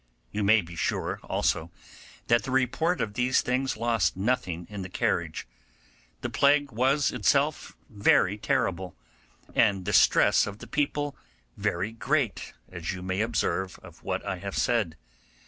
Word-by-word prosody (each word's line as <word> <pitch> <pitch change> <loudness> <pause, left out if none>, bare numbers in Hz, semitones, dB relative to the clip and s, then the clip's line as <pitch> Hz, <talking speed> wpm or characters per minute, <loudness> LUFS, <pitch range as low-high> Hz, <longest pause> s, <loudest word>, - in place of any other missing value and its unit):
You 105 0 -2
may 105 +2 +5
be 85 -1 -11
sure, - - -2
also, 80 +2 -1 0.6
that 115 0 +3
the 135 - -7
report 135 +7 +1
of 105 - -2
these 125 +4 +2
things 130 +2 -1
lost 115 -4 +1
nothing 95 -6 -1
in 105 -1 -7
the 95 - -6
carriage. - - -1 0.8
The - - -3
plague 145 0 +3
was 135 +5 +2
itself 140 +6 0
very 100 -2 +3
terrible, 95 -3 -1 0.6
and 95 -2 +3
the 100 +3 -3
distress 95 - +5
of 100 0 -6
the - - -10
people 145 -1 -1 0.4
very 95 +5 -1
great, 120 +1 -1 0.2
as 85 -2 -4
you 90 -1 -7
may 95 +2 -1
observe 95 -4 -1
of - - -14
what - - -3
I - - -2
have - - -5
said. 80 - +1
110 Hz, 150 wpm, -27 LUFS, 95-130 Hz, 0.8 s, may